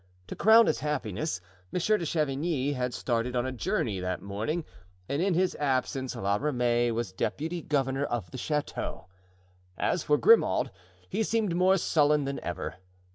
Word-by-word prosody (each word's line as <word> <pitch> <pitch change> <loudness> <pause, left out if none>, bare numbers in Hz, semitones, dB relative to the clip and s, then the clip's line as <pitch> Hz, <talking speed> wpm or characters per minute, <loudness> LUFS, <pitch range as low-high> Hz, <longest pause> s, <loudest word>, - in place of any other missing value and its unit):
To - - -5
crown 225 +2 +7
his 155 - +1
happiness, 135 - -2 0.3
Monsieur 200 +5 +2
de 170 - -3
Chavigny 145 -1 0
had 125 -2 -2
started 120 0 -1
on 120 0 +1
a 130 - -2
journey 105 -3 -1
that 90 0 -2
morning 110 - -3 0.4
and 140 +3 -1
in 190 -1 +2
his 185 +1 +2
absence 130 -2 -1
La 100 -3 0
Ramee 120 -3 +1
was 115 -4 -2
deputy 160 - -3
governor 135 -2 0
of 115 -11 -3
the - - -6
chateau. 150 - -3 0.7
As 175 - 0
for 150 0 +2
Grimaud, 220 - +4 0.4
he 220 - -2
seemed 220 -5 0
more 185 +2 +4
sullen 150 -4 +2
than 140 0 -3
ever. 90 +1 -5
140 Hz, 160 wpm, -28 LUFS, 120-165 Hz, 0.7 s, crown